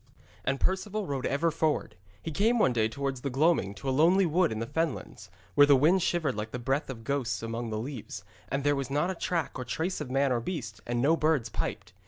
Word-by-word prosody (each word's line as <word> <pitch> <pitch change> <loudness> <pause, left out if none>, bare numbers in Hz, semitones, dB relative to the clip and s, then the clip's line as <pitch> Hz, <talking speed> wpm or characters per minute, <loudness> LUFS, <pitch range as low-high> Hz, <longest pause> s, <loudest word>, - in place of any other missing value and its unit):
And 135 0 0
Perceval 200 +2 -1
rode 135 -5 -2
ever 160 +4 +1
forward. 155 -1 0 0.3
He 165 - -4
came 220 +10 +2
one 135 - +3
day 110 -2 +2
towards 135 +1 -3
the 140 - -2
gloaming 135 - +2
to 135 - -8
a - - +2
lonely 175 +7 +5
wood 170 +1 +2
in 110 - -3
the 115 - -2
fenlands, 160 +3 -3 0.2
where 145 0 +7
the 145 - +7
wind 165 +8 +4
shivered 160 -6 +1
like 105 +1 -4
the 125 - -5
breath 135 +5 -1
of 115 -4 -7
ghosts 120 -6 -1
among 115 +1 -3
the 110 - -3
leaves, 125 +1 -6 0.3
and 135 0 -1
there 145 0 +3
was 135 -2 -3
not 150 +6 +1
a - - -2
track 170 -5 -2
or - - -2
trace 160 +9 -2
of 145 - -5
man 135 +1 +2
or 120 - +2
beast, 115 - -5
and 120 0 0
no 160 +4 +5
birds 155 -7 +1
piped. - - -4
140 Hz, 235 wpm, -29 LUFS, 120-165 Hz, 0.3 s, where